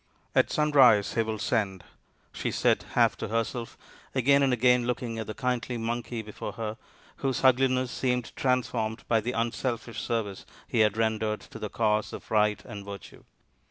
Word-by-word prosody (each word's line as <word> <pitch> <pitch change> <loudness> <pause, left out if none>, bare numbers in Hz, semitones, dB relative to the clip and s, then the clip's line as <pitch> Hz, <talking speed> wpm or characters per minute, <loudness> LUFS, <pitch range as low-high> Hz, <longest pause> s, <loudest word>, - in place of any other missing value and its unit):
" - - -38
At - - +4
sunrise 135 -9 +5
he 115 - +2
will 110 -1 -2
send," 100 -4 -1 0.5
she - - -2
said - - +1
half - - +4
to - - -4
her 115 +2 +1
self, 115 +1 -7 0.4
again 140 +2 +4
and 135 -1 +3
again 125 0 +3
looking 120 -2 -2
at 110 - -4
the 110 - -5
kindly 125 -1 -1
Monkey 115 0 -3
before 105 -1 -7
her 110 -1 -4 0.4
whose 135 -1 -1
ugliness 130 -1 +3
seemed 125 -2 -1
transformed 120 -3 -1
by 115 -2 +3
the 120 +3 -3
unselfish 115 -1 -2
service 105 -4 -2 0.2
he 115 - -1
had 110 -1 +3
rendered 110 -1 0
to 115 - -11
the 105 -1 -4
cause 105 -1 0
of - - -9
Right 105 -1 +2
and 100 -1 -8
Virtue. 100 -2 -10
115 Hz, 175 wpm, -28 LUFS, 110-125 Hz, 0.5 s, sunrise